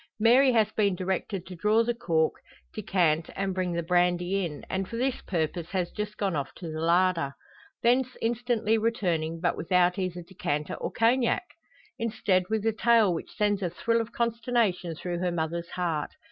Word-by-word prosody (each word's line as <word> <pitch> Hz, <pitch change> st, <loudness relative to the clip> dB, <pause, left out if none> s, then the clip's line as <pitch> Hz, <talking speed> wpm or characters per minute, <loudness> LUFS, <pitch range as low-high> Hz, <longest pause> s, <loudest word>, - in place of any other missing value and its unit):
Mary 250 Hz, +5 st, +6 dB
has 220 Hz, -3 st, +3 dB
been 200 Hz, -4 st, +1 dB
directed 185 Hz, 0 st, -3 dB
to 185 Hz, -, -9 dB
draw 210 Hz, +6 st, +3 dB
the 240 Hz, +1 st, 0 dB
cork, 160 Hz, -8 st, +1 dB, 0.4 s
decant, 175 Hz, -6 st, +1 dB
and 195 Hz, 0 st, -1 dB
bring 185 Hz, -1 st, -1 dB
the 170 Hz, 0 st, -1 dB
brandy 180 Hz, +2 st, +1 dB
in, 150 Hz, -4 st, -5 dB
and 190 Hz, 0 st, -2 dB
for 230 Hz, -, -5 dB
this 260 Hz, +1 st, -1 dB
purpose 165 Hz, -1 st, -1 dB
has 180 Hz, -3 st, -1 dB
just 210 Hz, 0 st, -5 dB
gone 195 Hz, -4 st, -1 dB
off 140 Hz, -2 st, -2 dB
to 170 Hz, -3 st, -7 dB
the 155 Hz, 0 st, -4 dB
larder. 170 Hz, -4 st, +2 dB, 0.5 s
Thence 255 Hz, +2 st, +2 dB
instantly 225 Hz, -1 st, +1 dB
returning, 175 Hz, -8 st, -1 dB
but 175 Hz, 0 st, +1 dB
without 180 Hz, +2 st, +2 dB
either 180 Hz, -2 st, -3 dB
decanter 150 Hz, -5 st, -3 dB
or -, -, -4 dB
Cognac! 235 Hz, +5 st, +2 dB, 0.6 s
Instead 210 Hz, -5 st, +1 dB
with 220 Hz, -1 st, -1 dB
a 225 Hz, -, +2 dB
tale 225 Hz, -3 st, +4 dB
which 165 Hz, -, -6 dB
sends 205 Hz, -1 st, +1 dB
a 180 Hz, -, 0 dB
thrill 230 Hz, +7 st, 0 dB
of 225 Hz, -, -6 dB
consternation 230 Hz, -7 st, 0 dB
through 175 Hz, +1 st, -4 dB
her 180 Hz, 0 st, 0 dB
mother's 170 Hz, +1 st, -3 dB
heart. 165 Hz, -5 st, -2 dB
185 Hz, 175 wpm, -27 LUFS, 170-225 Hz, 0.6 s, Mary